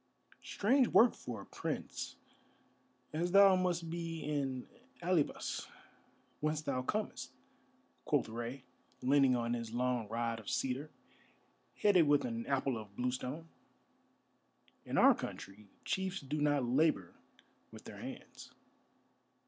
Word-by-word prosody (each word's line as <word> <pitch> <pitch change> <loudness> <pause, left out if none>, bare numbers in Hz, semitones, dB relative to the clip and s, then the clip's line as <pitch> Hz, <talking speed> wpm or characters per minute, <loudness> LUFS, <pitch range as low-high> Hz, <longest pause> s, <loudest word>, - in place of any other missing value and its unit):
"Strange 250 +5 +2
work 235 +1 +6
for 115 -5 -7
a - - -11
prince, - - -5 1.0
as 175 +3 -1
thou 195 -1 +8
must 180 -2 0
be 165 -1 -4
in 135 -4 -2 0.4
Alybas, 170 -4 0 0.7
whence 155 0 0
thou 135 -3 -1
comest," 210 +12 -3 0.7
quoth - - +1
Rei, 120 +3 -5 0.4
leaning 135 -1 +4
on 120 0 -1
his 115 -2 -4
long 125 -2 0
rod 115 +1 -2
of 105 - -8
cedar, 135 +3 -1 0.9
headed 185 -7 +6
with 145 - +4
an 235 -1 -4
apple 135 -3 0
of 105 -2 -11
bluestone. 130 +6 -3 1.4
"In - - -2
our - - +8
country 100 +2 -8 0.2
chiefs 190 -1 -1
do 145 +2 -3
not 145 -2 +2
labour 125 - +2 0.6
with - - -12
their - - -10
hands." - - -9
140 Hz, 120 wpm, -34 LUFS, 120-170 Hz, 1.4 s, thou